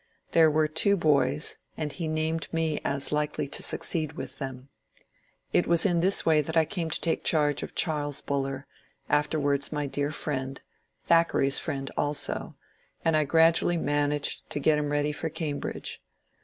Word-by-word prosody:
There 165 -1 +5
were 155 0 +2
two 180 +6 +2
boys, 140 - +2 0.2
and 150 -2 -3
he 165 0 -4
named 155 0 -2
me 160 -2 -1
as 140 0 +1
likely 150 -1 -1
to - - -1
succeed 160 -3 +1
with - - -8
them. 135 -1 -7 0.8
It - - +3
was 170 +2 +4
in 175 -4 +2
this 190 +4 +2
way 155 -2 +4
that 160 +3 -3
I 160 - +5
came 170 -2 -3
to - - -1
take 165 - 0
charge 150 -3 +2
of - - -7
Charles 145 -3 0
Buller, 135 0 -3 0.2
— - - -38
af 150 - -5
ter 155 - -1
wiurds 140 -1 0
my 150 -1 -2
dear 145 +1 -2
friend, 135 -3 -4 0.4
Thackeray's 165 -5 +3
friend 135 -1 -4
also, 145 0 -1 0.2
— - - -36
and 165 -1 +3
I 155 -1 +2
grad 165 +3 +5
ually 175 -1 0
managed 145 -1 -1
to - - -2
get 150 +1 +3
him 150 -1 -2
ready 145 0 +1
for 160 +2 -4
Cambridge. 150 -2 -4
150 Hz, 185 wpm, -27 LUFS, 145-160 Hz, 0.8 s, There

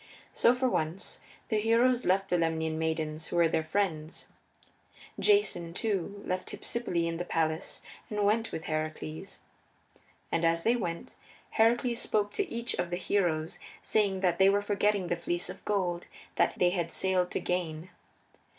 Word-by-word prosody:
So, 240 - +4
for 255 +1 +1
once, 165 -4 -2 0.3
the 215 -3 +2
heroes 235 +3 +3
left 195 +1 +2
the 180 - +2
Lemnian 160 -1 0
maidens 160 -1 -2
who - - -5
were 170 -1 +5
their 160 0 0
friends. 160 -3 -2 0.9
Jason, 180 - +3
too, 200 -1 -1
left 185 0 -2
Hypsipyle 180 -8 -2
in 165 0 -2
the 175 - -2
palace 160 -2 -1 0.3
and 210 -1 -1
went 225 +3 +2
with 160 - -5
Heracles. 155 - -4 0.9
And 165 - 0
as 165 0 +3
they 235 +2 +3
went, 170 -7 -4 0.3
Heracles 235 +1 +3
spoke 205 -1 +1
to 405 - -2
each 235 +1 -1
of 175 - 0
the 175 - -2
heroes, 175 -3 0 0.2
saying 200 -3 +2
that 175 -3 +1
they 190 0 +7
were 200 +1 +2
forgetting 205 -1 +1
the 175 - 0
Fleece 175 +1 -2
of - - -12
Gold 180 -4 -1 0.3
that - - +1
they 175 0 +3
had 175 -3 -2
sailed 185 -1 +2
to - - -2
gain. 175 -1 -3
180 Hz, 160 wpm, -30 LUFS, 165-210 Hz, 0.9 s, they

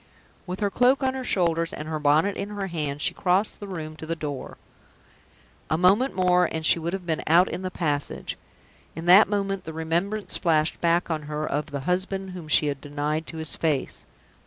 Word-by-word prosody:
With 185 +3 -5
her 205 -1 +1
cloak 255 +4 +3
on 260 0 +1
her 265 -1 -4
shoulders, 170 -6 +1
with 150 - -6
her 155 0 -3
bonnet 150 +7 +3
in 200 - -4
her 205 -2 -4
hand, 150 -5 -3
she - - +2
crossed 185 +3 +1
the 205 - -7
room 155 -5 -6
to 160 - -8
the 165 - -1
door. 145 -4 -6 1.1
A 155 - +1
moment 200 +10 +3
more 180 -1 +3
and 160 -1 -3
she 170 - +5
would 170 +2 -3
have 190 -2 -4
been 160 -2 -1
out 175 +4 +5
in - - -4
the 185 - -3
passage. 150 -6 -2 0.6
In 165 +2 -6
that 185 +4 +7
moment 195 -2 -1
the 160 - -6
remembrance 170 +6 -2
flashed 160 -2 +1
back 170 0 +2
on 155 -1 -1
her 150 0 -2
of 150 +1 -2
the 140 -2 -5
husband 190 +4 -1
whom 180 -3 -8
she 155 - +3
had 140 -2 -2
denied 150 +2 -3
to 165 - -7
his 160 -1 -1
face. 150 -5 -1
170 Hz, 205 wpm, -25 LUFS, 155-190 Hz, 1.1 s, that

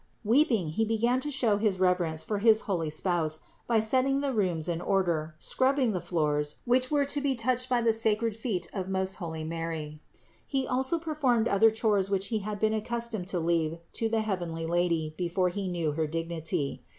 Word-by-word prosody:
Weeping, 230 - +2
he 190 +9 0
began 230 +3 +1
to 295 - -4
show 245 -7 +1
his 205 -3 0
reverence 180 -4 +1
for 210 -2 -2
his 220 0 +5
heavenly 170 -6 -2
Spouse, 155 -1 0 0.3
by 230 -2 +3
setting 260 +5 +3
the 280 -1 -1
rooms 180 -8 0
in 170 -1 -2
order, 170 -6 0
scrubbing 260 - +1
the 180 -4 -2
floors, 150 -3 -1
which 255 +1 +2
were 290 -2 +2
to 285 +1 -1
be 275 -2 +1
touched 255 +2 0
by 245 -2 +2
the 230 -1 +3
sacred 225 0 +2
feet 210 -7 -3
of 190 -2 -4
most 190 0 -1
holy 160 -4 -5
Mary. 160 -2 -5 0.5
He 270 -2 -1
also 260 +6 +2
performed 290 -8 +1
other 225 +2 +5
chores 215 -3 +1
which 195 0 0
he 220 -2 0
had 210 +1 -4
been 215 +1 +1
accus 235 +2 -2
tomed 195 -5 -4
to 185 -2 -1
leave 165 -1 0 0.2
to 225 - -1
the 225 0 +1
heavenly 175 -6 -3
Lady 165 -2 0
before 180 +1 +1
he 195 +2 -4
knew 170 -4 -1
her 155 +1 -1
dignity. 165 -2 -3
200 Hz, 195 wpm, -28 LUFS, 165-235 Hz, 0.5 s, his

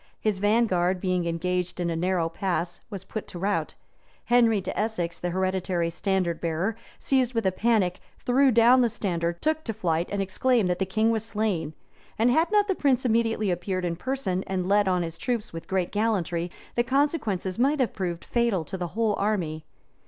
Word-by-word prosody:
His 210 -3 0
vanguard, 190 -4 +2
being 180 -2 0
engaged 180 +2 -2
in 170 -1 0
a - - -1
narrow 175 0 +1
pass, 175 -1 -2
was 200 -4 -6
put 215 +2 -6
to - - -8
rout: 200 +3 -1 0.5
Henry 235 -3 +4
de 190 - -5
Essex, 205 -6 -2
the 175 - -2
hereditary 185 -2 -1
standard 185 -2 -1
bearer, 170 +6 -1 0.2
seized 255 -2 +1
with 225 -3 0
a 190 - +3
panic, 195 -3 +1 0.2
threw 265 +2 +3
down 240 +2 +6
the 240 - +3
standard, 170 -6 -2
took 315 0 +1
to 225 - -3
flight, 170 -5 0
and 200 - -1
exclaimed 195 +1 +1
that 180 - -2
the 190 - 0
king 220 +4 +2
was 220 -2 0
slain; 205 -9 -2 0.4
and 235 +3 +3
had 320 +8 +2
not 415 -1 +4
the 390 - +2
prince 270 -7 +1
immediately 225 -3 +1
appeared 180 +1 -2
in 170 -1 -1
person, 195 -4 -2
and 185 -1 -2
led 205 0 +3
on 180 -1 +2
his 165 0 -6
troops 235 -5 -2
with 165 - -7
great 185 -2 -1
gallantry, 180 -6 0 0.2
the 240 - +2
consequences 235 - 0
might 280 +4 +2
have 255 - +1
proved 175 -3 -4
fatal 235 -8 +1
to 190 +5 -6
the 175 - -2
whole 225 -2 +2
army. 170 -7 -1
195 Hz, 190 wpm, -26 LUFS, 175-230 Hz, 0.5 s, down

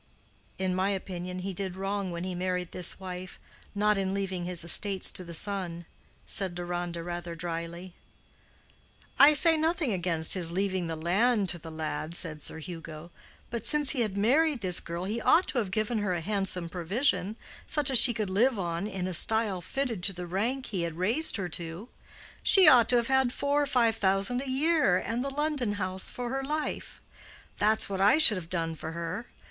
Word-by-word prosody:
"In 190 -1 -2
my 185 +2 0
opinion 180 -2 -5
he 195 - -4
did 185 0 -4
wrong 195 0 -3
when 170 0 -5
he 185 0 -4
married 180 0 -3
this 180 +1 -3
wife—not 190 +3 -4
in 190 0 -2
leaving 190 -3 -3
his 175 -2 -2
estates 190 +3 +3
to 185 - -8
the 170 -1 -7
son," 175 -3 -3 0.4
said 190 -3 -2
Deronda, 175 -1 -5
rather 175 0 -6
dryly. 170 +1 -6 1.3
"I 295 +2 +8
say 325 +3 +5
nothing 315 -5 0
against 170 -3 +2
his 175 -3 0
leaving 190 -1 -1
the 165 - -4
land 195 +6 +1
to 175 - 0
the 165 - -10
lad," 160 +1 -5
said 155 -4 -6
Sir - - -5
Hugo; 165 0 -9 0.4
"but 235 -2 -4
since 295 +3 +3
he 260 - 0
had 210 -4 -2
married 275 +6 +2
this 180 -3 +1
girl 170 +1 -6
he 215 +5 -3
ought 340 +4 +4
to 255 - 0
have 210 -5 -3
given 215 +3 -1
her 195 -3 -1
a 170 - -4
handsome 195 -2 -1
provision, 190 - -1 0.3
such 295 -2 +2
as 255 - +8
she 250 - +8
could 215 -4 -3
live 235 +5 +2
on 175 +1 -3
in 190 -3 -5
a 185 - -4
style 215 0 +2
fitted 235 +2 -3
to 195 +2 +2
the 180 0 -7
rank 230 +10 -2
he 190 -5 -4
had 165 -1 -4
raised 230 - +1
her 195 -4 -3
to. 170 +7 -7 0.5
She 385 -2 +8
ought 245 -6 +6
to 250 - +5
have 235 -1 +2
had 265 -2 +2
four 285 +3 0
or 290 - -1
five 235 -4 +1
thousand 195 +5 +1
a 275 - -6
year 285 - +2
and 230 +6 -3
the 275 - -3
London 285 -6 -2
house 185 -2 0
for 245 -1 -6
her 270 0 -3
life; 300 +2 -5 0.6
that's 215 +1 +2
what 195 -1 -4
I 205 +9 +5
should 235 -10 +9
have 165 -2 -8
done 165 -2 -3
for 160 +1 -7
her. 170 +7 -5
195 Hz, 195 wpm, -28 LUFS, 175-235 Hz, 1.3 s, should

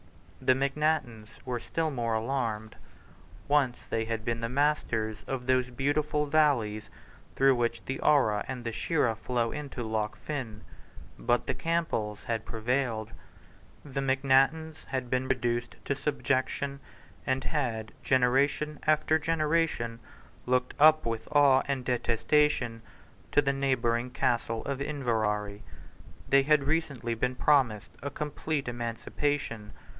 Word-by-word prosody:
The 130 - +4
Macnaghtens 135 -5 0 0.2
were 125 -2 -2
still 160 +6 -2
more 115 -4 -1
alarmed. 110 -2 -2 0.7
Once 140 -4 +1
they 115 0 0
had 110 0 -3
been 115 -1 -1
the 115 - -2
masters 125 -6 0
of 130 -2 -3
those 130 0 +2
beautiful 145 +3 0
valleys 135 -9 +2 0.5
through 135 0 +5
which 120 -1 -1
the 130 - -3
Ara 120 -9 +3
and 130 -2 -5
the 115 - -3
Shira 115 0 0
flow 115 +1 -1
into 140 -4 -5
Loch 110 -1 -2
Fyne. 125 -8 -6 0.6
But 120 0 +1
the - - -1
Campbells 160 -12 -1
had 115 -2 -2
prevailed. 115 -1 -1 0.7
The 140 -1 -3
Macnaghtens 135 +4 +2
had 130 -2 -4
been 130 0 +1
reduced 120 -2 -1
to - - +1
subjection, 140 -1 -1 0.5
and 130 0 +1
had, 115 -6 -2
generation 140 +4 +2
after 155 +1 +3
generation, 155 -7 0 0.5
looked 125 0 +1
up 155 -1 +6
with 115 -1 -3
awe 140 -3 +6
and 135 -3 -2
detestation 120 0 +1 0.5
to 145 - +4
the 140 -1 +1
neighbouring 125 -3 0
Castle 115 -2 -1
of 140 -1 -3
Inverary. 110 -8 -1 0.7
They 140 0 +5
had 150 +1 +3
recently 140 -6 -1
been 125 +3 -1
promised 125 -8 +2
a 140 - -3
complete 150 0 -3
emancipation. 120 -1 -3
130 Hz, 130 wpm, -29 LUFS, 115-145 Hz, 0.7 s, up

